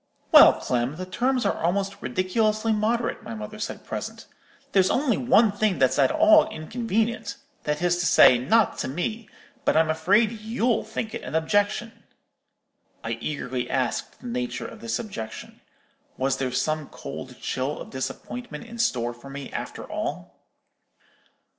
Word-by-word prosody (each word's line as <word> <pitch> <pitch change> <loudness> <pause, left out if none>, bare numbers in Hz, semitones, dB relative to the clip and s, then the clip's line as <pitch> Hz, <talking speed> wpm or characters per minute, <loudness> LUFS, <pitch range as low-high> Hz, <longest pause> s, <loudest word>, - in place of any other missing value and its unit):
"'Well, - - +10
Clem, 125 +3 -1
the 185 +3 -5
terms 250 +7 0
are - - 0
almost 195 +3 -1
ridiculously 215 +4 +1
moderate,' 230 +3 0
my 115 - -7
mother 105 -1 -7
said, - - -5
presently. - - -5 0.5
'There's 190 -1 +4
only 255 -4 +2
one 235 -3 +4
thing 205 -2 0
that's 130 0 +2
at - - +5
all 315 0 +5
inconvenient, 225 +7 -2 0.3
that 150 +2 -1
is 175 0 +2
to 175 - +1
say, 125 - +7
not 215 - +2
to - - -2
me, 210 - -3 0.3
but - - +2
I'm 160 0 +4
afraid 200 +8 +3
you'll 225 +1 -1
think 220 0 -5
it 235 - -4
an 130 - -6
objection.' 205 +7 +1 1.1
"I 115 - -3
eagerly 130 -4 -3
asked 130 -3 -2
the - - -13
nature 245 0 -3
of 220 - -9
this 230 0 -2
objection. 115 - -7 0.6
Was 135 0 0
there 130 -1 -2
some 155 +3 -1
cold 70 - -8
chill 130 +3 -2
of - - -9
disappointment 135 - -6
in 235 0 -10
store 120 - 0
for 120 +3 -13
me, 140 0 -8
after - - -5
all? - - -5
195 Hz, 155 wpm, -25 LUFS, 135-230 Hz, 1.1 s, Well